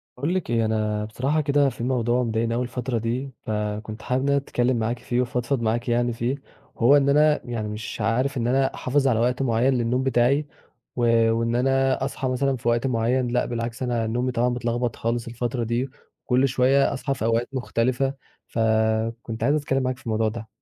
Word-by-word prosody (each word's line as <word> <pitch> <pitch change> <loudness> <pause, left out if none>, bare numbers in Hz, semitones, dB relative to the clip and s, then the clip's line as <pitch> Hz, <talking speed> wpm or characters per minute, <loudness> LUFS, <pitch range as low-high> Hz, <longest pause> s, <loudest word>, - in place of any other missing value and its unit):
باقول 145 +8 -1
لِك 185 - -2
إيه، 115 -1 +2
أنا 105 -1 -1
بصراحة 135 +8 0
كده 145 -1 +3
في 120 - -7
موضوع 125 -1 +1
مضايقني 115 0 0
أوي 125 - 0
الفترة 125 0 -3
دي، 120 +5 -2
فكنت 105 0 -3
حابب 125 +1 -1
إن - - -1
أنا 140 - +3
أتكلِّم 130 -2 0
معاكِ 115 +2 -1
فيه 120 - -2
وأفضفض 125 +1 -1
معاكِ 115 +2 -1
يعني 120 0 +1
فيه، 120 +3 -1 0.4
هو 130 +5 +6
إن 140 -1 +2
أنا 150 +1 +4
يعني 115 -3 -3
مش 105 +1 -6
عارف 130 +5 0
إن 115 -1 0
أنا 135 +2 +2
أحافظ 135 +2 0
على 115 -4 +2
وقت 125 +2 +1
معيّن 125 +1 +2
للنوم 125 +1 0
بتاعي، 135 +3 +2 0.5
و 115 -2 +3
وإن 115 +1 0
أنا 135 +1 +2
أصحى 135 -1 -3
مثلًا 130 +1 0
في 120 - -6
وقت 120 +2 +2
معيّن 125 +1 +1
لأ، 120 +1 +1
بالعكس 120 +1 -4
أنا 120 -3 0
نومي 120 +3 -1
طبعًا 120 0 +1
متلخبط 120 -1 -1
خالص 115 +1 -2
الفترة 120 +1 -2
دي، 120 +4 -1 0.4
كل 130 +2 +3
شوية 135 +2 +3
أصحى 135 +1 -2
في 125 - -4
أوقات 115 +1 +1
مختلفة، 130 +1 0 0.3
فكنت 110 +1 0
عايز 140 +4 +3
أتكلّم 135 -3 0
معاكِ 130 0 -1
في - - -19
الموضوع 110 -1 +1
ده. 110 0 -7
120 Hz, 195 wpm, -24 LUFS, 115-130 Hz, 0.5 s, هو